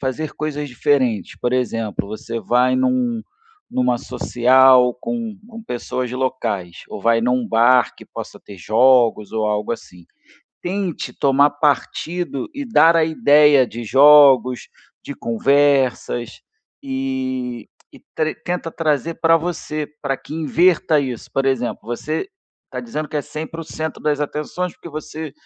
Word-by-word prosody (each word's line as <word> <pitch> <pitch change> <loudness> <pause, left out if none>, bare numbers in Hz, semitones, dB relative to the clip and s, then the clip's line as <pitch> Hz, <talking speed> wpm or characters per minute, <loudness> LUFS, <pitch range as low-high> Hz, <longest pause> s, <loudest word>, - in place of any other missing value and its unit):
fazer 140 +3 -3
coisas 150 -1 -4
diferentes. 125 -5 0
Por 120 - -1
exemplo, 115 -5 -2
você 115 +2 -6
vai 125 +2 +2
num 240 - 0 0.5
numa 125 -1 +1
social 125 +1 +4
com 230 -3 -4
com 230 -1 -10
pessoas 125 - -4
locais, 110 -8 -3
ou - - -7
vai 115 +2 +2
num 125 0 0
bar 120 +3 +3
que - - -13
possa - - -9
ter 100 - -12
jogos, 115 +1 +3
ou 110 -1 -1
algo 105 0 -1
assim. 90 -6 -10 0.6
Tente 185 -1 -3
tomar 140 +1 +3
partido 150 +1 -2
e 285 +1 -5
dar 170 -9 +5
a 165 - +4
ideia 150 -3 +5
de 120 -1 -7
jogos, 135 -1 +5 0.4
de 140 - -7
conversas 130 -1 +1 0.4
e 130 -3 -4 0.2
e - - -16 0.2
tre 155 0 0
tenta 175 -1 -4
trazer 160 0 -1
pra 165 0 +3
você, 160 -2 -4 0.2
pra 135 -2 -1
que 150 - -10
inverta 165 0 +2
isso. 130 -5 -4
Por 135 0 0
exemplo, 130 -3 -1
você 135 - -3 0.4
tá - - -5
dizendo 155 -11 -5
que 155 - -4
é 145 - -1
sempre 160 +3 -7
o - - -7
centro 160 0 -6
das 150 -1 0
atenções 150 +4 -3
porque - - -12
você, 155 0 -7
135 Hz, 145 wpm, -20 LUFS, 125-155 Hz, 0.6 s, dar